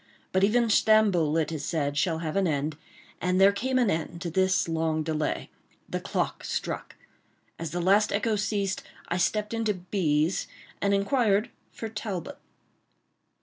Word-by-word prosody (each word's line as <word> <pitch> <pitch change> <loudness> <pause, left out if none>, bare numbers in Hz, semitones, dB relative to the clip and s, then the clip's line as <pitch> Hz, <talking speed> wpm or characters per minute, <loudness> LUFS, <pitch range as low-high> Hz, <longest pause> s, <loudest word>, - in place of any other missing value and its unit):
But 190 +1 +2
even 230 +4 +4
Stamboul, 210 -8 +4
it 160 0 0
is 155 -3 -4
said, 145 -3 -1
shall 160 +3 +1
have 155 - -3
an 195 -2 +2
end, 150 0 -1 0.5
and 180 +1 +1
there 195 +1 +7
came 255 +6 -1
an 240 -5 +3
end 165 +1 -3
to 170 - -3
this 190 +2 +2
long 160 -1 0
delay. 155 -1 -2 0.4
The - - -3
clock - - -2
struck. - - -4 0.6
As 165 -1 -3
the 175 +3 -3
last 200 +4 +4
echo 215 +2 +1
ceased, 200 -2 -1 0.3
I 175 - 0
stepped 210 +4 0
into 225 -2 0
B——'s 175 -3 0 0.3
and 200 0 +3
inquired 210 0 +2 0.2
for 225 - -6
Talbot. 210 -5 -5
190 Hz, 155 wpm, -27 LUFS, 160-210 Hz, 0.6 s, there